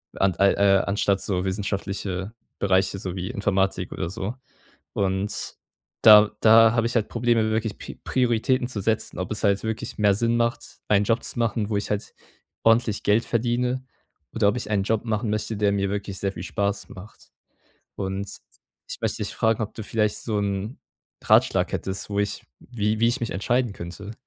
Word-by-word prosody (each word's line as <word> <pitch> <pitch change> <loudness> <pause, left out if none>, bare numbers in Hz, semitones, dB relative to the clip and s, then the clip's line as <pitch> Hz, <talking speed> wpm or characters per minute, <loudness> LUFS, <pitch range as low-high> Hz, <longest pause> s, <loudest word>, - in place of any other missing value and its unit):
An 95 -1 +2
al 100 0 +4
äh, 100 -1 +4
anstatt 100 -1 +1
so 90 -2 -1
wissenschaftliche 100 0 -3 0.3
Bereiche, 95 0 +1
so 95 -1 -5
wie 90 +2 -4
Informatik 95 -5 0
oder 85 -2 -3
so. 100 +2 -4 0.6
Und 95 +1 -2 0.5
da 105 -1 +9
da 115 0 +7
habe 115 -1 +1
ich 120 - -5
halt 110 -2 +1
Probleme 115 -2 +1
wirklich 110 -1 -1
Pi - - -9
Prioritäten 125 0 +1
zu 105 -6 -4
setzen, 110 +2 -1
ob 90 - -4
es 110 - -3
halt 100 -1 +2
wirklich 110 0 -4
mehr 105 -2 +4
Sinn 115 +2 +1
macht, 115 +1 -2
einen 105 -1 +4
Job 115 +3 +1
zu - - -5
machen, 110 -2 0
wo 105 - 0
ich 100 - -3
halt 105 0 -3 0.5
ordentlich 115 -2 +3
Geld 105 +3 +3
verdiene 125 +2 0 0.5
oder 110 -3 +3
ob 105 - -1
ich 105 - -5
einen 100 -2 +2
Job 110 +3 -1
machen 110 -1 -1
möchte, 110 0 -2
der 100 -1 +2
mir 100 -1 0
wirklich 100 -1 -4
sehr 100 -1 -1
viel 85 - -7
Spaß 100 0 -2
macht. 95 +3 -13 0.6
Und 95 +1 -3 0.6
ich - - -6
möchte - - -1
dich - - -5
fragen, 110 0 +1
ob 105 - -7
du 110 - -6
vielleicht 105 0 0
so 110 -3 -1
'n 100 +4 -3 0.5
Ratschlag - - +3
hättest, 95 +2 -4
wo 100 - -1
ich 100 0 -2 0.2
wie 105 -3 -2
wie 115 - +4
ich 130 - -1
mich 115 - -2
entscheiden 120 +3 0
könnte? 90 +4 -8
105 Hz, 185 wpm, -24 LUFS, 100-115 Hz, 0.6 s, da